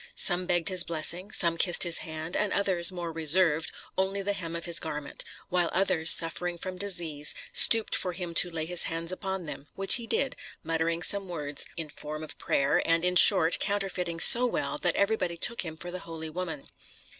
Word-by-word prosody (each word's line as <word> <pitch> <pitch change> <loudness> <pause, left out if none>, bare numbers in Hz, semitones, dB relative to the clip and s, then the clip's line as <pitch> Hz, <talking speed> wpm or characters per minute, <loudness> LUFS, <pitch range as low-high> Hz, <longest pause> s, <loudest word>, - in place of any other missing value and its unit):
Some 180 -1 +2
begged 175 0 +1
his 185 -2 +3
blessing, 170 +4 -3
some 170 -4 +3
kissed 175 -2 +3
his 170 -2 +3
hand, 160 +1 -6
and 210 - -1
others, 190 -3 +3
more 175 -2 -6
reserved, 160 0 +2 0.3
only 195 +1 -1
the 205 +1 -2
hem 170 -4 -7
of 170 - -6
his 170 -2 0
garment; 150 -2 -6 0.3
while 175 -1 0
others, 170 -4 +2
suffering 175 +1 +3
from 185 +1 -7
disease, 170 -7 -2 0.2
stooped 225 -1 +5
for 180 - -2
him 175 -1 -6
to 175 +1 +3
lay 160 -2 -4
his 175 +1 +2
hands 165 +1 -4
upon 190 -1 -5
them, 150 -1 -9
which 195 0 +3
he 230 - -9
did, 270 +3 -1 0.3
muttering 165 +1 -2
some 200 -2 +1
words 150 -4 -5
in 160 -2 -5
form 150 +1 -8
of 155 - -5
prayer, 140 0 0
and, 165 +1 0
in 180 0 +1
short, 165 -1 +6
counterfeiting 190 -4 -2
so 240 +8 +5
well - - -3
that - - 0
everybody 200 -4 -1
took 235 +7 +2
him 160 -3 -7
for 175 +2 -8
the 185 - -6
holy 160 -2 -9
woman. 165 -4 -6
175 Hz, 195 wpm, -27 LUFS, 160-185 Hz, 0.3 s, short